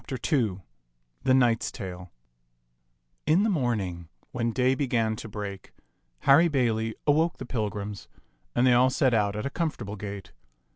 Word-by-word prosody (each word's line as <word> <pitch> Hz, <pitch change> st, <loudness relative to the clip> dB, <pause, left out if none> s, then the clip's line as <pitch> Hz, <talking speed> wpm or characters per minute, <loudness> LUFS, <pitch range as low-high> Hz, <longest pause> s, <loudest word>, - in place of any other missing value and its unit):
II 130 Hz, -, -1 dB
PALAMON 120 Hz, -4 st, +1 dB, 0.7 s
AND 130 Hz, 0 st, +5 dB
ARCITE 115 Hz, -2 st, +3 dB, 0.2 s
t^t -, -, -10 dB, 0.3 s
Mnx^^t -, -, -30 dB, 1.2 s
IN 170 Hz, +6 st, +4 dB
the 220 Hz, -, +2 dB
morning, 100 Hz, -, -2 dB, 0.2 s
when 115 Hz, -2 st, -1 dB
day 130 Hz, +2 st, +2 dB
began 120 Hz, -5 st, 0 dB
to 110 Hz, -, -8 dB
break, 100 Hz, -2 st, -7 dB, 0.5 s
Harry 145 Hz, +5 st, +6 dB
Bailey 115 Hz, -6 st, 0 dB
awoke 160 Hz, +4 st, +2 dB
the -, -, -7 dB
pilgrims, 105 Hz, -3 st, -4 dB, 0.5 s
and 120 Hz, -, +3 dB
they 125 Hz, -, +6 dB
all 125 Hz, +2 st, +5 dB
set 130 Hz, -1 st, +2 dB
out 105 Hz, -2 st, +1 dB
at 105 Hz, -, -3 dB
a 140 Hz, -, -2 dB
comfortable 120 Hz, -, -3 dB
gait. 100 Hz, -3 st, -7 dB
120 Hz, 155 wpm, -27 LUFS, 105-135 Hz, 1.2 s, Harry